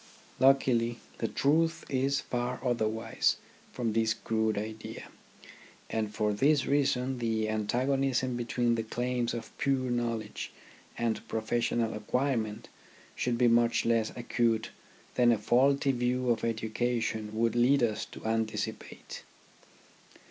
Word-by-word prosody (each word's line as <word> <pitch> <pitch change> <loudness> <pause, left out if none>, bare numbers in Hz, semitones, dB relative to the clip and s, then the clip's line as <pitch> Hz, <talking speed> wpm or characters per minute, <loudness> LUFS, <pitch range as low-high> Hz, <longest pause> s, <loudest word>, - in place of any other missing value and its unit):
Luckily, 125 -3 +3 0.2
the 115 - 0
truth 165 +7 +1
is 135 +1 +1
far 125 +1 -3
otherwise 110 -2 +1 0.4
from 115 -3 -2
this 110 0 +2
crude 110 -1 0
idea; 110 +1 -6 0.8
and 110 -2 -1
for 105 0 0
this 140 +6 +3
reason 135 -2 +1
the 110 -2 0
antagonism 130 +4 0
between 120 0 0
the 115 - 0
claims 120 +1 -1
of 115 -1 -6
pure 130 -2 +1
.knowledge 115 -3 -2 0.5
and 115 -2 -1
professional 115 0 0
acquirement 110 -1 -1 0.5
should 120 -1 0
be 125 0 +4
much 115 0 +3
less 115 -1 +2
acute 115 -2 0 0.4
than 120 -1 +4
a 115 - +3
faulty 135 +6 +3
view 125 0 0
of 115 - -1
education 110 -1 -1
would 115 +1 +1
lead 125 +2 +4
us 110 -2 0
to - - -12
anticipate. 110 0 -3
120 Hz, 120 wpm, -30 LUFS, 110-125 Hz, 0.8 s, be